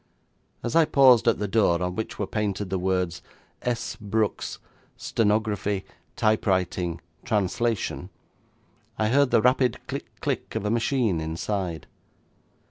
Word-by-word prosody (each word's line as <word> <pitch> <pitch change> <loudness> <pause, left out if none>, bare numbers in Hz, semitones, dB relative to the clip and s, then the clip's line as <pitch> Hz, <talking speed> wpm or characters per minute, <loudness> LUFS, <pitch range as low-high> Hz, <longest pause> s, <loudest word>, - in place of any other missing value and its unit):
As 120 - -2
I 165 -1 +6
paused 130 -5 +5
at 115 - +4
the 105 - -2
door 95 -4 +3
on 90 0 -2
which 110 - -4
were 105 - -1
painted 100 -2 -2
the 95 - 0
words, 90 -2 -1 0.4
'S. 120 -1 -2
Brooks, 105 0 -1 0.4
Stenography, 105 -2 0 0.3
Typewriting, 95 -5 +1 0.2
Translation', 105 -2 -1 0.9
I 110 0 +1
heard 140 +2 +4
the 110 - +3
rapid 125 -1 +3
click - - -6
click - - -3
of - - -2
a 105 - +1
machine 115 - +1
inside. 85 +1 -3
105 Hz, 130 wpm, -25 LUFS, 95-115 Hz, 0.9 s, I